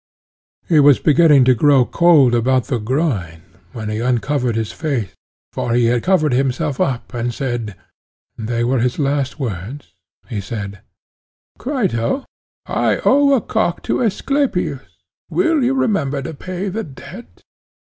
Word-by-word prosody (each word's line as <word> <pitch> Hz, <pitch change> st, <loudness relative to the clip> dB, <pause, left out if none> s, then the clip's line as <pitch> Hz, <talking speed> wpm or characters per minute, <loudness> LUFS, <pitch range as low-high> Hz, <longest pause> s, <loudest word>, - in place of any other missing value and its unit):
He 160 Hz, -3 st, +4 dB
was 145 Hz, -2 st, +6 dB
beginning 150 Hz, -4 st, +5 dB
to 130 Hz, -, +5 dB
grow 135 Hz, +1 st, +4 dB
cold 155 Hz, -7 st, +4 dB
about 125 Hz, +2 st, +2 dB
the 125 Hz, -4 st, -2 dB
groin, 105 Hz, -, -2 dB, 0.3 s
when 110 Hz, -2 st, -6 dB
he 105 Hz, 0 st, -3 dB
uncovered 125 Hz, +1 st, 0 dB
his 110 Hz, -2 st, -2 dB
face, 125 Hz, -, -3 dB, 0.4 s
for 120 Hz, -, -1 dB
he 120 Hz, -1 st, +3 dB
had 120 Hz, -, 0 dB
covered 165 Hz, -7 st, +2 dB
himself 130 Hz, +1 st, -1 dB
up, 130 Hz, 0 st, -2 dB
and 120 Hz, 0 st, -2 dB
said—they 120 Hz, -1 st, -6 dB
were 125 Hz, +2 st, +1 dB
his 125 Hz, +1 st, 0 dB
last 140 Hz, -1 st, -1 dB
words—he 115 Hz, -, -7 dB
said: 100 Hz, -1 st, -6 dB, 0.8 s
Crito, 245 Hz, -, -1 dB, 0.4 s
I -, -, 0 dB
owe 280 Hz, 0 st, +5 dB
a 250 Hz, -, +1 dB
cock 220 Hz, -6 st, -1 dB
to -, -, -1 dB
Asclepius; 215 Hz, -, -1 dB, 0.5 s
will 330 Hz, -6 st, +1 dB
you 260 Hz, +2 st, +1 dB
remember 195 Hz, -, 0 dB
to 165 Hz, -, -6 dB
pay 185 Hz, +5 st, -5 dB
the 220 Hz, +4 st, -3 dB
debt? 140 Hz, -8 st, -12 dB
135 Hz, 135 wpm, -18 LUFS, 120-170 Hz, 0.8 s, was